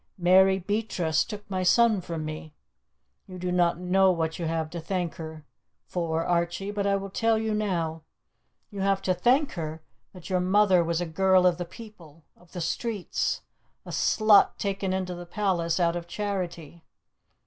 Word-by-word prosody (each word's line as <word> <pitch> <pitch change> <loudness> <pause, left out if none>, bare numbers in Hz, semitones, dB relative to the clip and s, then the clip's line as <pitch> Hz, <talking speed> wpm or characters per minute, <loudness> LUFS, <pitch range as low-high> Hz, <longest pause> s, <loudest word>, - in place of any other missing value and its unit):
Mary 190 +2 +5
Beatrice 190 -4 0
took 210 -2 -9
my 190 -2 -2
son 220 +2 +4
from 165 -3 -5
me. 155 0 -7 0.7
You 185 - -9
do 180 0 -3
not 175 -1 +2
know 185 +2 +3
what 160 -2 -2
you 170 - -2
have 160 -1 -2
to 175 - -5
thank 180 -1 -2
her 160 -2 -8 0.4
for, 165 -2 -2
Archie, 175 +3 -1
but 205 -1 -1
I 200 - +2
will 195 0 -4
tell 225 +2 +2
you 220 0 -1
now! 170 -7 -1 0.7
You 200 -2 -5
have 195 0 +1
to 185 - +2
thank 255 - +2
her 160 -2 -6 0.3
that 180 -3 -11
your 185 -2 +1
mother 185 -1 +4
was 170 +1 -1
a - - -1
girl 185 +2 +3
of 180 -1 +3
the 175 - -3
people 170 -8 -14
of 175 -1 -23
the 180 - -5
streets 205 +3 -2 0.4
a - - -8
slut 215 -2 +4
taken 195 -1 -2
into 185 -1 -2
the 175 0 -9
palace 175 -4 0
out 170 -1 +2
of 170 -1 -5
charity. 175 -5 -5
180 Hz, 175 wpm, -26 LUFS, 170-195 Hz, 0.7 s, Mary